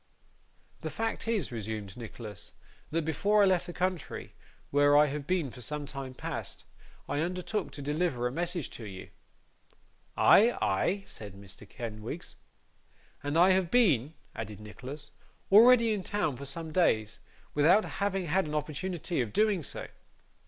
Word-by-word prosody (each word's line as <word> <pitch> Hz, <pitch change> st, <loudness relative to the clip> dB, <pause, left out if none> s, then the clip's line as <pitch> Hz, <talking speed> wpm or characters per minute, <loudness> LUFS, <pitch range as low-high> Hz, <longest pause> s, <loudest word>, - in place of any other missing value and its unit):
'The -, -, -4 dB
fact 225 Hz, 0 st, -3 dB
is,' 215 Hz, -, 0 dB
resumed 110 Hz, -3 st, -5 dB
Nicholas, 110 Hz, -3 st, -8 dB, 0.4 s
'that 165 Hz, 0 st, -1 dB
before 205 Hz, +7 st, +3 dB
I -, -, +7 dB
left 185 Hz, -3 st, +2 dB
the -, -, -5 dB
country, 180 Hz, -1 st, -3 dB, 0.4 s
where 145 Hz, 0 st, +5 dB
I 150 Hz, -, +7 dB
have 145 Hz, 0 st, -4 dB
been 175 Hz, -8 st, 0 dB
for 125 Hz, -, -11 dB
some 150 Hz, +3 st, -3 dB
time 135 Hz, -2 st, -7 dB
past, -, -, -6 dB, 0.4 s
I 145 Hz, -, -1 dB
undertook 180 Hz, +5 st, -2 dB
to 145 Hz, -, -7 dB
deliver 145 Hz, -4 st, 0 dB
a 125 Hz, -, 0 dB
message 175 Hz, +1 st, -2 dB
to 115 Hz, -, -8 dB
you.' 95 Hz, -2 st, -8 dB, 1.1 s
'Ay, 230 Hz, +4 st, +6 dB
ay?' 185 Hz, -, +1 dB
said 100 Hz, -3 st, -9 dB
Mr. 100 Hz, +1 st, -11 dB
Kenwigs. 115 Hz, -, -6 dB, 0.9 s
'And 145 Hz, +2 st, -1 dB
I 180 Hz, +3 st, +7 dB
have 185 Hz, -2 st, +2 dB
been,' 160 Hz, -, +3 dB, 0.2 s
added 105 Hz, -2 st, -6 dB
Nicholas, 125 Hz, +7 st, -9 dB, 0.4 s
'already 230 Hz, +2 st, +7 dB
in 205 Hz, -, -2 dB
town 180 Hz, -8 st, -1 dB
for 140 Hz, +3 st, -8 dB
some 160 Hz, +3 st, -6 dB
days, 110 Hz, -, +2 dB, 0.3 s
without 170 Hz, +9 st, +5 dB
having 195 Hz, -2 st, -1 dB
had 180 Hz, +2 st, +1 dB
an 150 Hz, -, -4 dB
opportunity 165 Hz, +1 st, -2 dB
of 115 Hz, -4 st, -3 dB
doing 210 Hz, -4 st, +2 dB
so. 140 Hz, -, -4 dB
150 Hz, 150 wpm, -30 LUFS, 125-185 Hz, 1.1 s, I